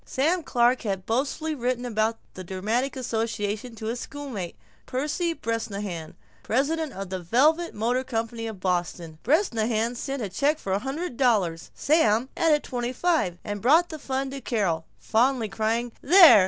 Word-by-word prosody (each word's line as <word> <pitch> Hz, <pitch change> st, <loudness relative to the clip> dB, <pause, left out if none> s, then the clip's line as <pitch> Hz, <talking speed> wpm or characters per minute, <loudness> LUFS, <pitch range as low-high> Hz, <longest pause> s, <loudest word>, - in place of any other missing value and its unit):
Sam 325 Hz, +7 st, +1 dB
Clark 245 Hz, -3 st, +2 dB
had 195 Hz, -4 st, -3 dB
boastfully 280 Hz, +6 st, -1 dB
written 250 Hz, -2 st, -1 dB
about 225 Hz, -1 st, 0 dB, 0.2 s
the 185 Hz, -, -7 dB
dramatic 215 Hz, +9 st, -1 dB
association 225 Hz, -2 st, -2 dB
to 220 Hz, -, -7 dB
his 235 Hz, +2 st, -2 dB
schoolmate, 255 Hz, -, -6 dB, 0.3 s
Percy 300 Hz, +6 st, -1 dB
Bresnahan, 205 Hz, -, -4 dB, 0.3 s
president 295 Hz, +5 st, 0 dB
of 195 Hz, -1 st, -6 dB
the 185 Hz, -, -2 dB
Velvet 300 Hz, -, +2 dB
Motor 240 Hz, +4 st, +1 dB
Company 230 Hz, -2 st, -3 dB
of 215 Hz, -4 st, -7 dB
Boston. 175 Hz, -3 st, -2 dB
Bresnahan 235 Hz, -, +1 dB
sent 270 Hz, +1 st, -4 dB
a 200 Hz, -, -3 dB
check 285 Hz, -, +1 dB
for 195 Hz, -10 st, -3 dB
a 195 Hz, -, +2 dB
hundred 270 Hz, +3 st, -4 dB
dollars; 200 Hz, -11 st, +2 dB
Sam 260 Hz, -5 st, +3 dB
added 305 Hz, -3 st, +3 dB
twenty 245 Hz, 0 st, -3 dB
five 310 Hz, -, +1 dB
and 205 Hz, -1 st, -4 dB
brought 320 Hz, -, +5 dB
the 315 Hz, -, -7 dB
fund 270 Hz, 0 st, -2 dB
to 275 Hz, 0 st, -6 dB
Carol, 180 Hz, -11 st, 0 dB
fondly 235 Hz, 0 st, +2 dB
crying, 225 Hz, +4 st, -1 dB
"There! 340 Hz, -, +9 dB
235 Hz, 155 wpm, -26 LUFS, 210-275 Hz, 0.3 s, There